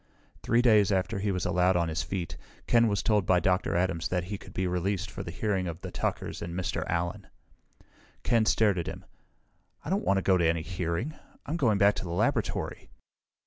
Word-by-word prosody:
Three 120 +2 +2
days 105 -5 +5
after 95 +2 0
he 100 +1 0
was 90 -2 -2
allowed 90 +1 +2
on 85 -1 +2
his 80 +1 -1
feet, 85 -6 -4 0.3
Ken 115 -1 +4
was 100 -3 0
told 105 -4 +2
by 90 -1 +4
Dr. 90 +1 +1
Adams 85 -2 0
that 90 -1 -1
he 100 +3 -5
could 95 - -13
be 95 0 -2
released 90 +1 -1
for - - -6
the - - -6
hearing 95 +1 -1
of 85 -1 -5
the - - -6
Tuckers - - -3
and 85 +1 -4
Mr. 85 -3 -2
Allen. 85 +1 -2 1.0
Ken 115 -2 +2
stared 105 -5 +3
at 85 - -4
him. - - -7 0.8
"I - - -3
don't - - +1
want 100 +2 +2
to 95 - 0
go 95 -1 +4
to 85 - +3
any 80 -1 0
hearing! 90 - -3 0.3
I'm 160 - -2
going 120 -11 +2
back 100 +1 +5
to - - -4
the 90 - -6
laboratory!" 85 - -1
95 Hz, 210 wpm, -28 LUFS, 85-105 Hz, 1.0 s, days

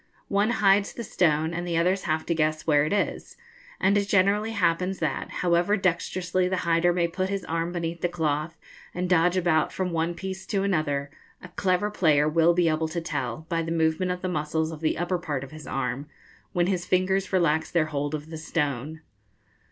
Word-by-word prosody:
One 205 +2 +2 0.2
hides 195 +1 +4
the 235 - -6
stone, 160 -5 +1
and 175 +1 -3
the 170 -1 0
others 180 +3 +1
have 155 -1 -1
to 170 - 0
guess 155 -1 0
where 150 -2 +4
it - - -2
is; 205 0 -2 0.4
and 195 +2 +3
it 200 -1 +1
generally 205 +3 +2
happens 185 -1 +1
that, 155 -5 -2
however 175 +4 +1
dexterously 180 0 0
the 185 - 0
hider 170 +1 +3
may 175 -1 +1
put 185 +2 -2
his 195 -1 -3
arm 165 +1 -2
beneath 170 -1 -4
the 175 - +1
cloth, 160 -1 -2 0.4
and 180 +1 -1
dodge 175 0 +3
about 165 -4 +2
from 185 -1 -2
one 165 +1 -1
piece 190 +1 -6
to 195 -2 0
another, 145 -7 0 0.3
a 180 - -9
clever 185 +3 0
player 150 -7 +3
will 165 +2 +3
be 175 -1 +3
able 160 0 +1
to 160 +2 -3
tell, 145 -3 -4
by 165 -1 0
the 165 0 -4
movement 160 +2 +1
of 180 0 -5
the - - 0
muscles 160 -1 -1
of 160 - -7
the 155 - 0
upper 175 +1 -1
part 145 -5 -3
of 140 - -10
his 155 0 -10
arm, 135 +1 -3 0.4
when 175 -2 +1
his 180 -2 -1
fingers 190 +1 +1
relax 160 -4 +2
their 165 -3 +2
hold 145 +1 -1
of 155 +2 -8
the 160 - -6
stone. 150 -1 -2
170 Hz, 205 wpm, -26 LUFS, 155-185 Hz, 0.4 s, hides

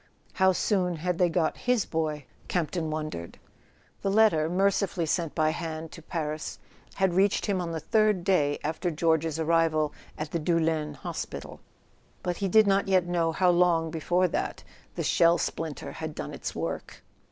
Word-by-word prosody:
How 190 -1 +4
soon 180 -2 +1
had 170 +2 -2
they 180 -1 +4
got 165 -1 0
his 245 -5 +3
boy, 155 -3 -2 0.2
Campton 170 -1 -1
wondered? 155 - -5 0.6
The 195 - 0
letter, 195 -7 +4
mercifully 195 -1 +1
sent 165 0 -1
by 155 -1 +2
hand 160 -1 -5
to 165 - -10
Paris, 155 -1 -4 0.4
had 190 -2 +2
reached 195 +2 +2
him 195 -3 0
on 170 -1 -3
the 165 - -3
third 215 -1 +2
day 150 -7 +2
after 160 +4 -1
George's 160 -1 +1
arrival 160 -2 +2 0.2
at 150 0 -5
the 170 - -1
Doul 165 +1 +1
lens 155 -2 -1
hospital; - - -6 0.6
but 180 -1 -2
he 200 - -1
did 215 +3 +6
not 195 0 +2
yet 185 -2 +3
know 170 -2 +1
how 180 +2 +3
long 170 -2 +3
before 175 +3 +1
that - - -3 0.3
the - - -2
shell 170 0 +4
splinter 160 -4 -4
had - - -6
done - - -5
its - - -5
work. - - -5
170 Hz, 170 wpm, -27 LUFS, 155-185 Hz, 0.6 s, did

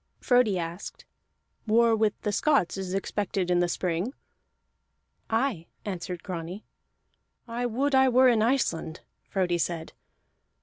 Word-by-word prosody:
Frodi 245 -7 +3
asked: 170 +2 -6 0.6
"War 230 +1 +4
with 215 -1 +1
the 210 - -1
Scots 270 - +2
is 190 -1 -4
expected 195 -2 -1
in 175 - +3
the 175 - +2
spring?" 180 - -2 1.1
"Aye," 225 -7 0 0.2
answered 180 -3 -5
Grani. 180 +3 -6 0.8
"I 240 +1 -2
would 270 +5 0
I 265 0 +5
were 255 +1 +5
in 235 -3 +4
Iceland!" 215 -10 0 0.3
Frodi 180 -3 0
said. 165 -1 -3
205 Hz, 125 wpm, -27 LUFS, 175-240 Hz, 1.1 s, I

